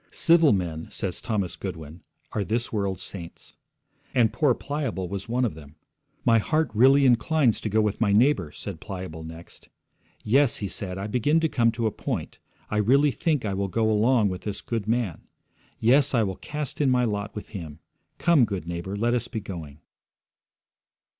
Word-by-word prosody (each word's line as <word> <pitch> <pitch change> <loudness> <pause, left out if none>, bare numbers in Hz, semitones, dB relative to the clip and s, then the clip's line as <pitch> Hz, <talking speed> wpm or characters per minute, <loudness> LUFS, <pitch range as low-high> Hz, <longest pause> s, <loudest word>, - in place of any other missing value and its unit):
'Civil 165 -3 +4
men,' 85 -5 -2
says 90 -3 -3
Thomas 100 -6 -2
Goodwin, 80 +1 -7 0.3
'are 105 - -1
this 115 +5 -2
world's 100 -4 -2
saints.' 85 -4 -9 0.6
And 115 -4 +3
poor 145 -6 +3
Pliable 140 -10 -3
was 100 +4 -6
one 125 +2 +1
of 115 - -2
them. 75 -1 -13 0.5
'My 115 -1 +5
heart 155 +7 0
really 135 +5 +5
inclines 125 +1 +3
to 110 - -2
go 110 +2 +3
with 105 +1 -1
my 105 -3 +3
neighbour,' 105 - +3
said 95 -1 -7
Pliable 90 -6 -7
next. 80 +1 -11 0.5
'Yes,' 135 +3 +3
he 100 - -3
said, 95 -1 -4
'I 95 - -4
begin 125 +9 +2
to 160 - +3
come 115 -6 +2
to 115 0 -2
a 110 - +1
point. - - -5 0.3
I 105 - 0
really 135 +7 +4
think 150 -4 -1
I 100 - -1
will 100 +1 -1
go 110 +3 +1
along 110 0 +3
with 90 0 -5
this 105 -1 -5
good 115 -3 -3
man. 115 -7 -1 0.6
Yes, 135 +4 +4
I 115 - +4
will 95 -2 -2
cast 150 -1 -5
in 140 - +3
my 125 -1 +3
lot 105 -1 -3
with 105 - -7
him. 80 -8 -7 0.4
Come, 170 -6 +4
good 100 -6 -4
neighbour, 85 +3 -4
let 120 +3 +1
us 120 -1 -1
be 115 - -4
going.' 80 -8 -8
110 Hz, 185 wpm, -25 LUFS, 95-125 Hz, 0.6 s, My